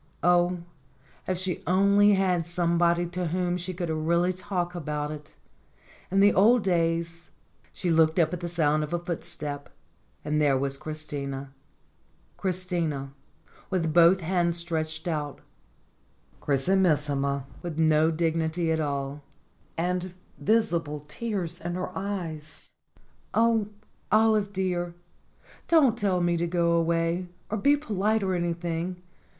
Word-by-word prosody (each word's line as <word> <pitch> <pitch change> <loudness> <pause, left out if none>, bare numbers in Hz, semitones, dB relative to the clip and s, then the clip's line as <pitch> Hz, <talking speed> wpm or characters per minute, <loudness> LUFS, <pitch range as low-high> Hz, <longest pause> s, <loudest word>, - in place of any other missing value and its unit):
Oh, 175 0 +3 0.6
if 185 - 0
she 185 -1 -2
only 200 +3 +5
had 180 -3 +1
somebody 170 0 +2
to 180 0 -3
whom 175 +1 0
she 180 +1 -3
could 175 -2 -3
really 170 +3 +1
talk 180 -2 -3
about 150 -3 -3
it! 150 0 -10 0.7
In 195 +1 +3
the 205 +1 +6
old 220 +4 +5
days 170 -1 -1 0.4
She 180 - -2
looked 160 0 +4
up 165 -2 +3
at 180 - -3
the 175 0 -4
sound 155 -3 +2
of 150 - -5
a - - +2
footstep, 165 -4 -5 0.6
and 150 0 +1
there 140 -3 +3
was 135 0 -2
Christina 140 -3 -5 0.8
Christina, 170 -7 -2 0.6
with 165 -5 0
both 175 +3 +6
hands 170 0 +1
stretched 160 -1 -3
out 150 -4 -3 1.0
Chrisimissima, 145 -3 +1 0.2
with 170 -3 -5
no 160 0 +4
dignity 165 0 0
at 160 - +1
all, 140 -1 -3 0.6
and 180 +1 -2 0.2
visible 170 -9 +1
tears 175 +1 -4
in 175 +1 -3
her 185 0 -4
eyes. 170 -6 -5 0.6
"Oh, 225 -2 +3 0.4
Olive 215 -2 +3
dear! 180 -3 -2 0.7
don't 290 -9 +5
tell 195 -5 0
me 175 0 +1
to 170 +1 0
go 170 -1 +1
away, 170 +1 +1 0.2
or 215 - 0
be 285 +7 +4
polite 215 -5 0
or 190 -1 0
anything. 175 0 -2
170 Hz, 130 wpm, -27 LUFS, 160-185 Hz, 1.0 s, the